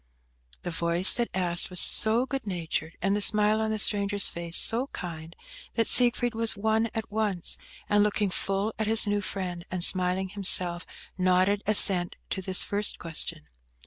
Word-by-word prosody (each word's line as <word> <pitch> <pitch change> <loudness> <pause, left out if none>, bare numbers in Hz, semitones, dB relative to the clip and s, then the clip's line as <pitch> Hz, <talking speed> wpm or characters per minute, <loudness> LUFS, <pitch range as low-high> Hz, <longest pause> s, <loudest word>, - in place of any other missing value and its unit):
The 175 - -6
voice 170 +3 +3
that 240 -1 -3
asked 175 -2 -1
was 180 -1 -3
so 225 +3 +5
good 270 -4 -7
natured, 165 -3 -5
and 195 +1 0
the 205 - -3
smile 210 +1 +2
on 220 - -3
the 220 - -3
stranger's 205 -1 +1
face 170 0 -4
so 240 +4 0
kind, 165 - -10 0.4
that 230 - +1
Siegfried 245 0 +2
was 225 -1 -1
won 220 +2 -1
at 220 -1 -6
once, 205 -5 -2 0.3
and 205 0 +1
looking 210 -1 -2
full 195 +4 -3
at 220 - -2
his 225 +1 +6
new 205 0 -2
friend, 185 -3 -6
and 180 -1 -4
smiling 185 +1 +1
himself, 180 -3 +2 0.3
nodded 185 +2 0
ascent 190 -4 +4 0.2
to 190 - -4
this 185 0 +1
first 205 +1 +2
question. 165 -1 -7
200 Hz, 170 wpm, -25 LUFS, 180-220 Hz, 0.4 s, his